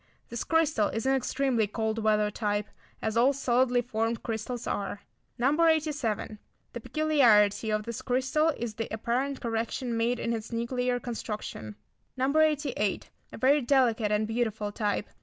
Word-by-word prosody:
This 235 Hz, -, -4 dB
crystal 315 Hz, -10 st, +2 dB
is 225 Hz, +2 st, -3 dB
an 265 Hz, -, +3 dB
extremely 260 Hz, -3 st, +1 dB
cold 220 Hz, +1 st, -2 dB
weather 210 Hz, -1 st, +2 dB
type, 205 Hz, -1 st, -1 dB, 0.4 s
as 220 Hz, 0 st, -1 dB
all 250 Hz, +4 st, +4 dB
solidly 250 Hz, -2 st, +2 dB
formed 225 Hz, -1 st, -2 dB
crystals 230 Hz, +1 st, -4 dB
are. 200 Hz, 0 st, -3 dB, 0.4 s
No. 285 Hz, +7 st, +2 dB
87. 295 Hz, -10 st, 0 dB, 0.3 s
The -, -, -5 dB
peculiarity 235 Hz, -10 st, +3 dB
of 215 Hz, 0 st, 0 dB
this 235 Hz, +1 st, -5 dB
crystal 260 Hz, +5 st, +1 dB
is 235 Hz, -2 st, -4 dB
the 225 Hz, +1 st, -4 dB
apparent 250 Hz, +5 st, -2 dB
correction 235 Hz, +1 st, -2 dB
made 235 Hz, +2 st, 0 dB
in 235 Hz, -, -1 dB
its 225 Hz, 0 st, -5 dB
nuclear 245 Hz, +1 st, -1 dB
construction. 215 Hz, -, -6 dB, 0.4 s
No. 265 Hz, +3 st, 0 dB
88. 295 Hz, -10 st, +1 dB, 0.2 s
A -, -, -8 dB
very 280 Hz, +5 st, +4 dB
delicate 240 Hz, -5 st, +2 dB
and 210 Hz, +1 st, +1 dB
beautiful 220 Hz, -2 st, -1 dB
type. 205 Hz, 0 st, -1 dB
235 Hz, 150 wpm, -28 LUFS, 220-265 Hz, 0.4 s, all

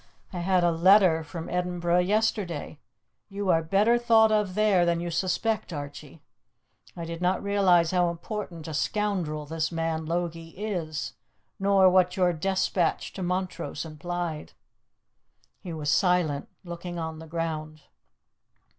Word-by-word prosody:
I 180 Hz, -, -4 dB
had 180 Hz, 0 st, +2 dB
a 175 Hz, -, +4 dB
letter 175 Hz, -1 st, +5 dB
from 165 Hz, +1 st, -7 dB
Edinburgh 180 Hz, -1 st, 0 dB
yesterday; 195 Hz, -5 st, -1 dB, 0.5 s
you 200 Hz, -1 st, -3 dB
are 165 Hz, -2 st, +4 dB
better 205 Hz, +8 st, +3 dB
thought 225 Hz, -2 st, +5 dB
of 210 Hz, -4 st, +1 dB
there 210 Hz, -4 st, +3 dB
than 170 Hz, -1 st, +1 dB
you 170 Hz, 0 st, -4 dB
suspect, 190 Hz, +5 st, -1 dB
Archie. 145 Hz, 0 st, -8 dB, 0.7 s
I 170 Hz, -, -4 dB
did 165 Hz, +1 st, -6 dB
not 180 Hz, +1 st, +1 dB
realize 185 Hz, -5 st, +3 dB
how 180 Hz, -1 st, +2 dB
important 170 Hz, -1 st, -6 dB
a 160 Hz, -, -5 dB
scoundrel 175 Hz, -4 st, -1 dB
this 160 Hz, +2 st, -2 dB
man 165 Hz, -1 st, -2 dB
Logie 165 Hz, 0 st, -3 dB
is, 175 Hz, -7 st, -3 dB, 0.5 s
nor 195 Hz, -1 st, +5 dB
what 180 Hz, 0 st, +3 dB
your 180 Hz, -2 st, +3 dB
despatch 185 Hz, 0 st, 0 dB
to 190 Hz, -, -7 dB
Montrose 180 Hz, -4 st, -3 dB
implied." 160 Hz, 0 st, -5 dB, 1.1 s
He 180 Hz, -, -8 dB
was 150 Hz, -2 st, -2 dB
silent, 175 Hz, -7 st, +1 dB
looking 175 Hz, 0 st, -7 dB
on 160 Hz, -1 st, -4 dB
the 160 Hz, -, -10 dB
ground. 155 Hz, -2 st, -4 dB
175 Hz, 135 wpm, -27 LUFS, 160-190 Hz, 1.1 s, letter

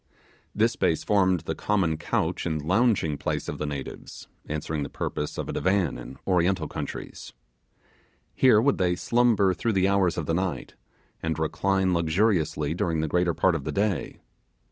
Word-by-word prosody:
This -, -, +3 dB
space 80 Hz, -, 0 dB
formed 95 Hz, -4 st, +2 dB
the -, -, -3 dB
common 95 Hz, -6 st, 0 dB
couch 80 Hz, -, -1 dB
and 80 Hz, -2 st, -1 dB
lounging 90 Hz, -, +1 dB
place -, -, -2 dB
of -, -, -5 dB
the 75 Hz, -, -2 dB
natives, 70 Hz, -2 st, -7 dB, 0.2 s
answering 75 Hz, 0 st, -3 dB
the 70 Hz, -, -4 dB
purpose 75 Hz, -, -4 dB
of -, -, -3 dB
a -, -, -4 dB
divan 95 Hz, -8 st, 0 dB
in -, -, -9 dB
Oriental 90 Hz, 0 st, +1 dB
countries. -, -, -7 dB, 1.0 s
Here 125 Hz, -5 st, +5 dB
would 135 Hz, +1 st, +2 dB
they 90 Hz, -1 st, +2 dB
slumber 115 Hz, -3 st, +2 dB
through 110 Hz, +6 st, -1 dB
the 95 Hz, -1 st, +3 dB
hours 95 Hz, -3 st, +2 dB
of 85 Hz, -, -2 dB
the 80 Hz, -, -1 dB
night, 90 Hz, +1 st, -2 dB, 0.5 s
and 80 Hz, -1 st, -2 dB
recline 95 Hz, +4 st, +1 dB
luxuriously 85 Hz, -3 st, +1 dB
during 80 Hz, -2 st, -1 dB
the 80 Hz, -, -1 dB
greater 90 Hz, +1 st, +1 dB
part 95 Hz, -, +3 dB
of 80 Hz, -4 st, -3 dB
the -, -, -3 dB
day. 100 Hz, -2 st, -1 dB
90 Hz, 165 wpm, -26 LUFS, 80-100 Hz, 1.0 s, Here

